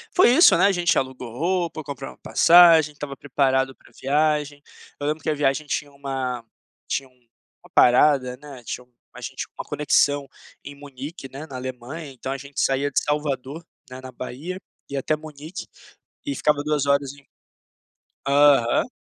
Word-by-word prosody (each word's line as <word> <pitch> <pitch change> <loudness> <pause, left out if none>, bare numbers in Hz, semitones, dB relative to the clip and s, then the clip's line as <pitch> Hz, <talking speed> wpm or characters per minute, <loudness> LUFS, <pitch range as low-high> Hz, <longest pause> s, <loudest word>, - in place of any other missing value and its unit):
Foi 365 - +6
isso, 325 +8 +7
né, - - +4
a 200 - +5
gente 175 -2 +1
alugou 130 -2 -3
roupa, 170 0 -1
compramos 140 -2 -7
a - - -50
passagem, 165 -3 +6
estava 145 -1 -7
preparado 135 -1 0
para - - -22
a - - -27
viagem. 150 +1 0 0.4
Eu 145 - -4
lembro 155 +1 -2
que - - -2
a 155 - +1
viagem 145 +1 0
tinha 145 0 -3
uma 135 -3 -4 0.4
tinha 135 - -2
uma 125 -3 -27
parada, 125 0 +5
né, 140 -3 -12
tinha 125 - -6
um 125 - -33 0.2
a - - -11
gente - - -5
uma - - -4
conexão 145 -1 +1 0.4
em 145 - -9
Munique, 140 +2 -9
né, 140 +3 -8
na 135 - -9
Alemanha. 130 +4 -7
Então 130 0 -6
a 135 - -2
gente 140 +1 -8
saía 135 +1 +1
de - - +2
Salvador, 145 0 -2 0.3
né, 130 0 -9
na 130 0 -9
Bahia, 145 +9 -6 0.3
ia 140 - -2
até 155 +3 0
Munique 155 +3 -9 0.6
e 285 -1 -2
ficava 150 -1 +1
2 150 -1 0
horas 140 -1 +1
em 140 0 -18 1.0
Aham. 140 -4 +4
140 Hz, 175 wpm, -23 LUFS, 130-150 Hz, 1.0 s, isso